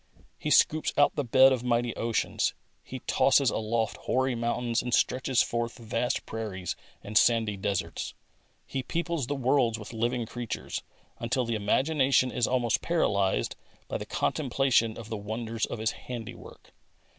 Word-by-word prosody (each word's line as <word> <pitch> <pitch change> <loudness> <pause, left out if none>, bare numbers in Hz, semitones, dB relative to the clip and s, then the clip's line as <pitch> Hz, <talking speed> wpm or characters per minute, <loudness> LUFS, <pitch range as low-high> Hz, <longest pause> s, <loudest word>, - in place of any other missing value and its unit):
He - - -3
scoops 155 0 +4
out 145 - +4
the 145 - 0
bed 130 +2 +6
of 125 -2 -2
mighty 120 -1 0
oceans. 115 -1 0 0.3
He 130 -1 -8
tosses 135 -1 +4
aloft 110 0 -1
hoary 130 0 0
mountains 120 0 0
and 125 -1 +1
stretches 130 0 +2
forth 120 0 -3
vast 115 +1 -2
prairies 100 -5 -4 0.3
and 105 - -8
sandy 115 -2 +4
deserts. 95 -1 -3 0.5
He 135 - -3
peoples 170 -1 -2
the 145 - -1
worlds 130 -3 +2
with 105 +1 -9
living 120 +1 -1
creatures, 120 0 -5 0.4
until 125 +2 0
the 115 - -2
imagination 130 +4 +2
is 120 - +1
almost 120 -3 +1
paralysed 100 - +1 0.3
by - - -3
the - - -7
contemplation 130 -5 +1
of 110 -2 -9
the 110 - -3
wonders 110 +2 -3
of - - -5
His 110 0 0
handiwork. 120 -3 -9
120 Hz, 150 wpm, -28 LUFS, 110-130 Hz, 0.5 s, bed